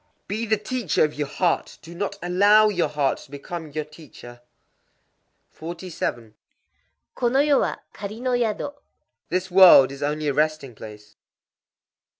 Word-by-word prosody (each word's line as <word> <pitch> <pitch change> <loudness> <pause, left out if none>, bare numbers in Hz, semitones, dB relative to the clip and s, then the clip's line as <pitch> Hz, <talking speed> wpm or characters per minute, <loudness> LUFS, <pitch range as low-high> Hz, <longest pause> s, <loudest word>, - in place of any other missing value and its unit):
_ - - -49
Be 220 +3 -3
the 220 0 +2
teacher 245 +4 -1
of 150 -1 0
your 150 -1 -3
heart: 175 +3 -1
do 165 - -11
not 200 +3 -4
allow 205 +4 +5
your 180 -4 0
heart 145 -3 -1
to - - -15
become 155 +3 -7
your 150 +1 -4
teacher. 145 -6 -14 1.1
47.—Kono 170 - -5
yo 285 -2 +4
wa - - -1 0.2
kari 210 +2 -7
no 255 +1 -2
yado. 245 +3 -1 0.6
This 185 +2 -2
world 180 -8 +8
is 140 - -10
only 150 +1 -2
a 145 - +1
resting 150 -3 -1
place. 105 -1 -13
170 Hz, 145 wpm, -23 LUFS, 145-210 Hz, 1.1 s, world